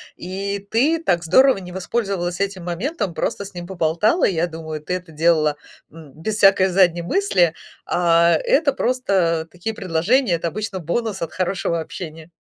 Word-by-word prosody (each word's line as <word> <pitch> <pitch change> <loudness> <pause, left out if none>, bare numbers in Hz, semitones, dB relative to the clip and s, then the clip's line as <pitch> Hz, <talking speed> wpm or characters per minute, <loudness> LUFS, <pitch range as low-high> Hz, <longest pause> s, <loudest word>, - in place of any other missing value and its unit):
и 195 +2 -5
ты 310 +9 +2
так 175 - +1
здорово 260 +9 +5
не 180 -2 -9
воспользовалась 190 -2 -2
этим 195 -2 -2
моментом, 195 - -3
просто 200 - -2
с 200 0 -10
ним 175 -1 -7
поболтала. 175 - +1
Я 170 -2 +2
думаю, 160 -2 -7
ты 155 - -4
это 180 -2 -5
делала, 155 -1 +2 0.3
м, 155 -3 -14
без 205 +7 -3
всякой 195 -2 +5
задней 175 -2 +3
мысли, 175 - +2 0.3
а 170 -1 +3
это 290 -1 +3
просто 195 -12 0
такие 200 +5 -5
предложения, 190 +5 +1
это 170 0 -2
обычно 200 +2 -4
бонус 195 +5 -2
от 165 - -4
хорошего 175 -2 -1
общения. 160 -1 -8
180 Hz, 160 wpm, -21 LUFS, 165-200 Hz, 0.3 s, здорово